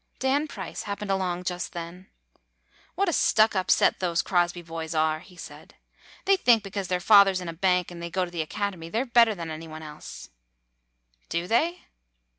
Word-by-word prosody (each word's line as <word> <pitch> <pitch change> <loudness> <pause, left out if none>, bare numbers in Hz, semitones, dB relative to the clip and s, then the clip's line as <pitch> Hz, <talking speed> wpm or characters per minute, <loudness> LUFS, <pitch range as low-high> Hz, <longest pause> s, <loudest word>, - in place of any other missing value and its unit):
Dan 275 +4 +1
Price - - -7
happened 200 0 -3
along 180 -2 -1
just 180 -1 -4
then. 175 +2 -8 0.9
"What 395 - +1
a 345 - +1
stuck 215 -5 +3
up 185 -1 -1
set - - +4
those 175 -2 0
Crosby 175 -1 0
boys 165 -1 -6
are,'' 155 0 +1
he 180 +2 -17
said. - - -11 0.5
"They 390 0 +4
think 235 - +4
because 195 -1 -4
their 180 0 0
father 200 0 +6
's - - 0
in 180 - -7
a 165 - -4
bank 180 0 +1
and 170 -1 -9
they 170 - -5
go 185 +2 0
to 175 - -11
the 170 -2 -2
Acad 200 +6 -3
emy, 165 -2 -10
they 225 - 0
're - - -9
better 235 -3 +4
than 165 -3 -6
any 160 +1 -7
one 155 0 -9
else." 150 0 -10 1.0
"Do 170 +1 -1
they?" 320 - 0
180 Hz, 205 wpm, -26 LUFS, 170-210 Hz, 1.0 s, father